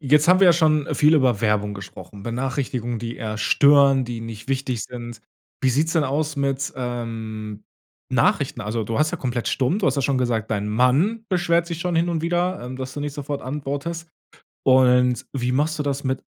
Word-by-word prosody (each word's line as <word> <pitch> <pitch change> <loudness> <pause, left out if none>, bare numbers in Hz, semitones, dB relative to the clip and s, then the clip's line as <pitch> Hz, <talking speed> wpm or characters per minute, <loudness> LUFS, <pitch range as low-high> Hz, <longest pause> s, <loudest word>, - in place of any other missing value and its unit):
Jetzt 150 +3 +3
haben 185 +1 +6
wir 190 - +7
ja 175 - +8
schon 155 -3 +2
viel 150 +2 +4
über 125 -8 +2
Werbung 105 -2 +1
gesprochen, 100 0 -10
Benachrichtigungen, 120 0 -3
die 115 +1 -5
eher 110 -1 -4
stören, 140 +2 +5
die 120 -1 -5
nicht 115 +1 -8
wichtig 130 -3 -1
sind. 120 -2 -9 0.4
Wie 130 - +3
sieht’s 155 +6 +1
denn 160 -3 +3
aus 150 +3 -1
mit, 140 0 -1
ähm, 110 -4 -5 0.5
Nachrichten? - - +1
Also, 110 +1 -3
du 115 +4 -2
hast 155 0 +2
ja 175 - -3
komplett 125 -4 -2
stumm. 140 +10 0
Du 200 - 0
hast - - +1
ja 140 - 0
schon 135 -1 +1
gesagt, 115 -3 -1
dein 105 -1 -1
Mann 140 - +2
beschwert 170 -2 +2
sich 170 -1 -5
schon 175 -2 -1
hin 170 +1 +2
und 165 -2 -1
wieder, 175 +2 0
ähm, 125 +1 -6
dass 130 0 -6
du 145 - -5
nicht 145 -1 -4
sofort 145 0 -4
antwortest. 145 +5 -4 0.6
Und 125 -1 +4
wie 125 -2 -1
machst 150 +3 0
du - - 0
das 140 -1 -2
mit 130 -1 -2
130 Hz, 200 wpm, -22 LUFS, 120-150 Hz, 0.6 s, ja